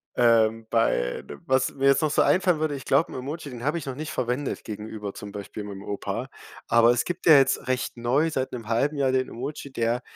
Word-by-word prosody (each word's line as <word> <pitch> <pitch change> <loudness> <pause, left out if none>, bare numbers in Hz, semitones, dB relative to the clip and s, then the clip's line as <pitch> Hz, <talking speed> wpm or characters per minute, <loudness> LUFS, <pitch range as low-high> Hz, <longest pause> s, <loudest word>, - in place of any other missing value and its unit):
ähm, 115 -2 +3
bei 60 - +1
d - - -9
was 130 0 +1
mir 135 0 +1
jetzt 140 +3 +5
noch 155 - +2
so 145 - +2
einfallen 180 -3 +3
würde, 155 -1 0
ich 135 - -8
glaube, 140 +5 +2
'n - - -8
Emoji, 145 +3 -6
den 120 -1 -8
habe 150 +4 +1
ich 165 - -6
noch 135 -2 -4
nicht 155 +3 -5
verwendet 125 +3 -2
gegenüber 105 -1 -6
zum 105 - -9
Beispiel 105 +1 -7
meinem 100 -1 -8
Opa, 100 -1 -4 0.4
aber 115 0 +6
es 120 -1 +1
gibt 175 0 -5
ja 160 - +9
jetzt 135 -1 +2
recht 130 -1 -2
neu 130 +7 +1
seit 130 -3 -2
'nem 115 -3 -7
halben 135 +6 +1
Jahr 135 -2 +2
den 130 0 +1
Emoji, 140 +3 -6
der 115 0 0
130 Hz, 230 wpm, -25 LUFS, 115-140 Hz, 0.4 s, ja